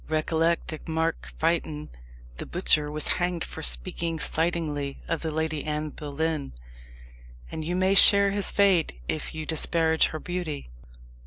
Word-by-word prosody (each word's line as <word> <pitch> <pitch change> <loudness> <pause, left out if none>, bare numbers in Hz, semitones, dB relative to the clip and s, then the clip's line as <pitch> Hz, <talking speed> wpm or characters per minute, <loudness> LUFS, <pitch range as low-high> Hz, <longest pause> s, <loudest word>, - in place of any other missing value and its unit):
"Recollect 160 +2 0
that 155 +1 -7
Mark 160 0 -2
Fytton, 155 -2 -1 0.5
the - - -6
butcher, 155 -4 +2
was 150 +1 -1
hanged 175 -2 -1
for - - -7
speaking 65 - -2
slightingly 155 -4 +1
of 165 - -2
the 160 - -2
Lady 160 -1 -2
Anne 150 0 -3
Boleyn; 150 - -3 1.0
and 160 - -5
you 175 +3 -2
may 185 +1 +2
share 200 +1 +8
his 200 0 0
fate 185 - +2
if 155 - -4
you 155 -1 -5
disparage 160 0 +1
her 155 - -6
beauty." 165 - -5
160 Hz, 145 wpm, -26 LUFS, 150-170 Hz, 1.0 s, share